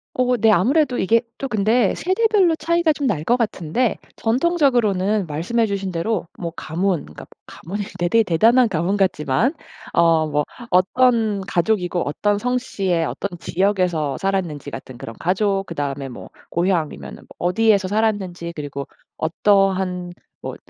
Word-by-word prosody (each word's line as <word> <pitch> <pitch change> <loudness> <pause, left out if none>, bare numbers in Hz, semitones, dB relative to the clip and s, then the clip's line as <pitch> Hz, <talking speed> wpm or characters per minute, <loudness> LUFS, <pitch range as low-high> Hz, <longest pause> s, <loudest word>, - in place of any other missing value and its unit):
어. 250 0 +2
네. 225 0 +4
아무래도 250 - +2
이게 225 +4 +3 0.2
또 275 - -3
근데 215 0 +2
세대별로 380 -2 +2
차이가 335 +1 +1
좀 290 -1 -3
날 205 -9 +1
것 240 - +4
같은데 220 0 -1 0.2
전통적으로는 225 - +1
말씀해 175 +10 0
주신 195 -2 -3
대로 175 +3 -2
뭐 170 -2 -4
가문 175 +2 -1
그러니까 75 - -11
뭐 - - -33 0.2
가문이 205 +5 -6 0.2
대 175 - +1
대 225 +6 +4
대단한 225 +8 +4
가문 175 +2 0
같지만 185 - +1 0.4
어 165 -2 +3
뭐 150 0 0 0.3
어떤 215 +2 +3
가족이고 180 -1 0
어떤 205 +8 0
성씨의 200 -8 -1
어떤 190 +1 -5
지역에서 175 -6 0
살았는지 180 -8 -2
같은 130 -2 -9
그런 115 -1 -8
가족 195 +2 0
그다음에 140 -4 -4
뭐 125 - -10 0.2
고향이면은 170 -3 -1
뭐 - - -23
어디에서 200 +1 +2
살았는지 195 -5 -1
그리고 140 -2 -6 0.3
어떠한 185 +1 +1 0.3
뭐 - - -6
195 Hz, 330 characters per minute, -21 LUFS, 170-225 Hz, 0.4 s, 네